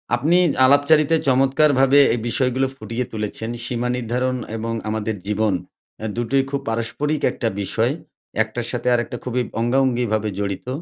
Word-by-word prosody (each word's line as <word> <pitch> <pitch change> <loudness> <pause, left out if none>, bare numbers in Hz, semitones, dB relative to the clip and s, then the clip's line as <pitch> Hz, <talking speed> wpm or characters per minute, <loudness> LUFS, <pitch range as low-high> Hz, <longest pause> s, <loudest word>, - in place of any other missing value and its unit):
আপনি 155 +8 +2 0.3
আলাপচারিতায় 150 +3 +4
চমৎকারভাবে 135 +1 +4
এই 120 - -1
বিষয়গুলো 130 +2 +1
ফুটিয়ে 125 -1 -4
তুলেছেন। 110 +1 -3 0.2
সীমা 120 0 -1
নির্ধারণ 125 +2 -1 0.2
এবং 115 +1 -3 0.2
আমাদের 110 0 -2
জীবন 105 0 +1 0.5
অ্যা 110 - -4
দুটোই 130 +3 +1
খুব 140 0 -2
পারস্পরিক 115 +7 -2
একটা 115 - -3
বিষয়। 115 +5 0 0.5
একটার 115 +2 -5
সাথে 125 0 -4
আরেকটা 120 0 -1
খুবই 125 0 -1 0.2
অঙ্গাঅঙ্গিভাবে 120 -3 +1
জড়িত। 100 +2 -3
125 Hz, 135 wpm, -21 LUFS, 115-135 Hz, 0.5 s, আলাপচারিতায়